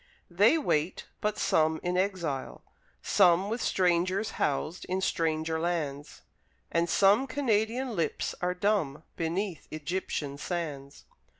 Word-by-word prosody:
They 205 - +5
wait; 165 - 0 0.2
but 210 0 0
some 160 -5 +2
in 180 0 -1
exile, 180 -8 -2 0.4
some 185 0 +4
With 230 +2 -2
strangers 185 +3 +1
housed, 155 +5 -1
in 185 +1 -1
stranger 160 -3 0
lands, 155 -4 -3 0.5
And 170 0 +1
some 205 +10 +4
Canadian 240 -2 0
lips 170 - -1
are 180 0 0
dumb 180 -7 0
Beneath 170 +1 -3
Egyptian 155 -3 -3
sands. 145 -5 -5
175 Hz, 115 wpm, -29 LUFS, 160-200 Hz, 0.5 s, They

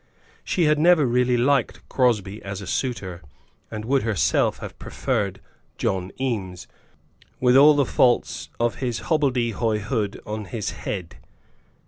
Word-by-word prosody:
She 180 - 0
had 150 -1 +3
never 170 -2 +5
really 125 0 +2
liked 130 0 +1
Crosbie 110 -5 0
as 100 -1 -6
a 100 - -7
suitor, 95 -6 -3 0.5
and 110 0 -6
would 135 +2 +2
herself 105 -11 +1
have - - -9
preferred - - -2 0.4
John 95 -1 -1
Eames, 100 -9 -3 0.7
with 125 0 +4
all 145 +2 +8
the 140 -1 +3
faults 125 -1 +1
of 120 0 0
his 120 -3 -3
hobbledehoyhood 115 - 0
on 105 0 -5
his 105 +2 -4
head. 90 -5 -6
120 Hz, 130 wpm, -23 LUFS, 100-130 Hz, 0.7 s, all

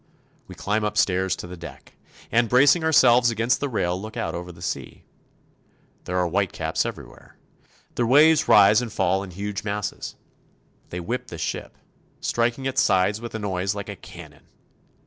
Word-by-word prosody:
We - - -11
climb 105 +2 -1
upstairs 95 -4 +1
to - - -8
the 90 +1 -8
deck, 85 -1 -12 0.4
and 115 -1 +2
bracing 145 +7 +5
ourselves 125 -6 +5
against 115 +2 +1
the 145 - -2
rail 90 -6 -1
look 110 +1 -8
out - - -2
over 90 +1 -6
the 85 - -16
sea. - - -5 1.0
There 90 - -2
are 90 - +2
white 95 +2 0
caps - - -2
everywhere. - - -11 0.6
The 120 - 0
waves 150 +4 +5
rise 105 +2 +6
and 120 -3 -5
fall 95 0 +1
in 100 - -7
huge 100 +2 -5
masses. 105 -1 -4 0.7
They 90 - -5
whip 120 +9 -4
the - - -8
ship, - - -5 0.4
striking 120 +3 -1
its 135 0 +1
sides 100 -2 +2
with 120 -1 -7
a - - -1
noise 95 -1 -2
like 100 0 -6
a 100 - -5
cannon. - - -13
105 Hz, 170 wpm, -24 LUFS, 95-120 Hz, 1.0 s, rise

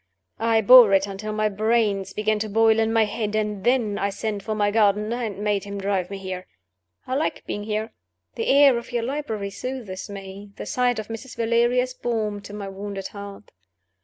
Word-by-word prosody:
I 225 0 +3
bore 240 0 +9
it 195 0 +4
until 200 +2 -6
my 215 0 +1
brains 210 -2 +1
began 215 +1 0
to 215 0 -3
boil 225 +1 +4
in 225 0 +2
my 225 -1 +4
head; 210 0 -3
and 210 -2 -2
then 235 -4 +1
I 200 - 0
sent 205 0 -3
for 215 +2 -3
my 205 -1 +1
gardener, 210 +1 +2
and 205 -2 -4
made 205 -2 0
him 200 0 -6
drive 195 -2 -1
me 200 - -5
here. 185 -1 -6 0.6
I 255 - -4
like 290 +4 -1
being 205 0 -4
here. 215 +1 -3 0.4
The 460 - -3
air 275 -3 +6
of 235 - -12
your 240 -1 -1
library 230 -7 -3
soothes 235 -6 -6
me; 200 0 -9
the - - -7
sight 245 -1 +1
of 215 0 -5
Mrs. 230 +3 -7
Valeria 235 +2 +2
is 255 0 -6
balm 215 -4 -2
to 200 - -11
my 205 -1 -6
wounded 195 0 -6
heart. 200 0 -10
215 Hz, 200 wpm, -24 LUFS, 200-230 Hz, 0.6 s, bore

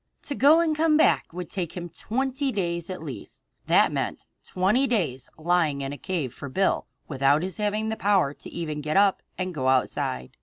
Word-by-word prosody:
To 285 - -4
go 295 +5 +5
and 320 -2 +1
come 310 0 +3
back 315 - +3
would 175 0 -6
take 175 -4 -3
him 175 0 -4
twenty 265 - -2
days 170 -5 -2
at 185 -3 -6
least. 140 -6 -9 0.2
That - - +4
meant - - -3 0.2
twenty 205 +9 +1
days 165 - -1
lying 160 -3 +1
in 135 +1 -4
a - - -7
cave 165 -10 -3
for 140 - -8
Bill, 190 +8 +1 0.2
without 140 +2 +2
his 185 -1 -4
having 210 +1 -1
the 220 - -1
power 195 -10 +2
even 155 -3 -5
to - - -5
get 155 +4 -1
up 200 -1 +4 0.2
and 185 -1 -3
go 130 -4 -2
outside. 125 - 0
180 Hz, 195 wpm, -25 LUFS, 150-215 Hz, 0.2 s, go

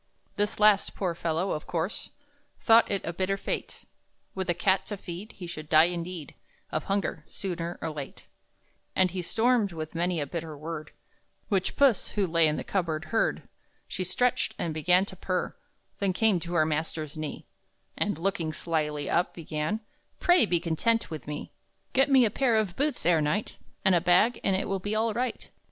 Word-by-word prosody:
This 205 0 -1
last, 210 -2 +4
poor 185 -4 -1
fellow, 165 +2 -1
of 155 - -4
course 170 +3 -3 0.5
Thought 230 0 +5
it 200 -1 -1
a 170 - -3
bitter 190 +3 0
fate; - - -4 0.5
With 190 -1 -3
a 175 - +2
cat 190 +2 +2
to 205 - -4
feed, 185 +4 -8
he 180 - -8
should 155 -3 -7
die, 155 0 +7
indeed, 170 -3 -5 0.4
Of - - -2
hunger, 195 -5 -1
sooner 175 -3 -4
or 165 - -1
late. 145 -3 -8 0.7
And 185 -1 +3
he 185 0 -3
stormed, 225 +1 +2
with 155 -1 -6
many 175 0 0
a 145 - -1
bitter 160 0 -5
word, 155 0 -6 0.6
Which 195 -4 0
Puss, 275 -6 +4
who 200 - +3
lay 165 -2 +4
in 150 - +1
the - - -3
cupboard, 165 -3 -1
heard. 225 - +1 0.4
She 185 - -3
stretched, 240 +7 0
and 165 - -2
began 180 +5 +3
to 195 - -9
purr, 185 -1 -2 0.4
Then 195 -2 +1
came 215 -2 +3
to 170 +1 -5
her 155 -2 +4
master's 155 -1 -2
knee, 155 -1 -5 0.5
And, 205 -6 -1
looking 170 -3 -1
slyly 150 -3 -2
up, 175 - +1
began: 155 +5 -3 0.4
"Pray 350 - +5
be 175 -2 +2
content 175 +6 0
with 155 -2 -6
me! 150 0 -5 0.4
Get 270 +2 +4
me 265 -3 +6
a 215 - +1
pair 245 0 +2
of 205 -5 0
boots 290 - -1
ere 170 -2 +4
night, 170 +8 -1 0.3
And 190 - +6
a 175 - +4
bag, 185 +7 +4
and 195 - +2
it 190 - -1
will 195 0 -1
be 205 +3 -2
all 220 0 +1
right!" 245 +1 -2
180 Hz, 185 wpm, -28 LUFS, 160-205 Hz, 0.7 s, die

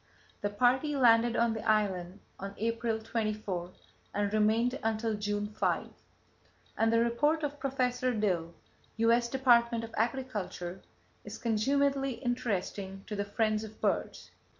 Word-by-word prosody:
The 205 - 0
party 255 +8 +2
landed 235 -2 +5
on 235 -1 +2
the 220 - -5
island 195 -3 0 0.2
on 195 +1 -6
April 230 0 -1
24 215 -5 -3 0.5
and 205 0 0
remained 225 +5 +2
until 225 0 0
June 205 0 -2
5, 210 +1 -1 0.9
and 225 0 +2
the 230 - +4
report 295 +7 +2
of 290 0 -3
Professor 255 -2 0
Dill 180 -7 -1 0.4
(U.S. 235 +1 +3
Department 235 -3 +3
of 225 0 -8
Agriculture) 215 -7 -3 0.4
is - - -8
consumedly 275 +4 +1
interesting 200 -5 -2
to 210 - -5
the 200 0 -2
friends 215 +1 0
of 220 0 -10
birds. - - -2
225 Hz, 130 wpm, -31 LUFS, 205-245 Hz, 0.9 s, landed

